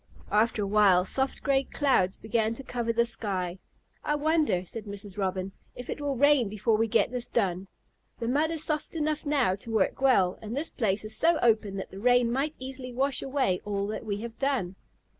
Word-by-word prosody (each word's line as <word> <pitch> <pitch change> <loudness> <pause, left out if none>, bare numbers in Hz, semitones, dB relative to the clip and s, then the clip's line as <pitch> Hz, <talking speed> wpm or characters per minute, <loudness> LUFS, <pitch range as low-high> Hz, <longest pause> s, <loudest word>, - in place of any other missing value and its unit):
After 215 0 +2
a - - -2
while, 195 -3 +4
soft 265 +6 -1
gray 275 -1 +3
clouds 255 -10 +1
began 220 +1 0
to 275 - -6
cover 240 -2 -2
the 235 +1 +2
sky. 190 -6 -3 0.4
"I 295 - 0
wonder," 300 - +1
said 220 +4 -7
Mrs. 200 -1 -7
Robin, 190 -1 -2 0.2
"if 245 - -7
it - - -5
will 285 -1 -1
rain 280 -4 +4
before 215 +2 +1
we 225 +1 +1
get 225 +1 +2
this 250 -1 -3
done. 190 -4 -1 0.5
The 230 - -4
mud 295 +6 +2
is 325 -2 -2
soft 305 +1 -2
enough 310 -1 -1
now 275 -10 +2
to 215 - -8
work 225 +3 +1
well, 195 -9 +3
and 220 +4 -5
this 310 +3 -2
place 215 -3 -1
is 215 +1 -3
so 330 +6 +3
open 215 -4 +2
that 190 - -6
the 195 - -9
rain 245 +1 +3
might 280 +5 -1
easily 260 -1 -6
wash 265 +2 0
away 260 -9 0
all 200 -1 -2
that 215 - -4
we 205 -2 -3
have 230 0 -8
done." 260 -10 -1
230 Hz, 205 wpm, -28 LUFS, 200-270 Hz, 0.5 s, while